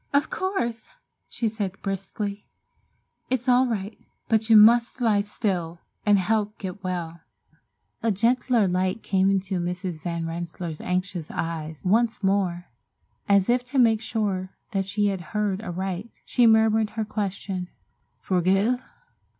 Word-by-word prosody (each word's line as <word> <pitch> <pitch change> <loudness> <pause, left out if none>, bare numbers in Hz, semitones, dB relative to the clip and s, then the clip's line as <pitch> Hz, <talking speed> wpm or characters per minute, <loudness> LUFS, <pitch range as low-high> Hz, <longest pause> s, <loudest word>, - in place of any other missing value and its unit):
"Of 285 +1 +2
course!" 240 - -2 0.4
she 230 - -2
said 205 -3 -3
briskly, 200 +1 -4 0.8
"it's 255 0 -1
all 255 +1 +5
right, 210 -2 -4 0.3
but 220 0 +2
you 220 - +8
must 235 +4 +6
lie 220 -4 +3
still 180 -5 -3 0.3
and 205 -1 +6
help 210 +2 0
get 190 0 -7
well." 170 -2 -4 0.8
A 230 - +1
gentler 230 +1 +2
light 185 +3 0
came 190 -1 +2
into 190 -1 0
Mrs. 180 -1 -4
Van 170 -1 -3
Rensselaer's 170 -1 -5
anxious 180 -2 -2
eyes. 160 -2 -4
Once 225 +3 +2
more, 190 -3 +1 0.6
as 200 -2 +4
if 245 +1 +2
to 265 +3 -4
make 225 -3 +4
sure 205 -5 -2 0.2
that 195 -2 0
she 205 +1 +1
had 190 -2 -3 0.2
heard 205 -2 0
aright, 190 +2 -5
she 245 -2 +4
murmured 220 -1 +3
her 220 - 0
question, 195 -3 -3 0.6
"Forgive?" 195 +7 +2
200 Hz, 135 wpm, -25 LUFS, 185-225 Hz, 0.8 s, you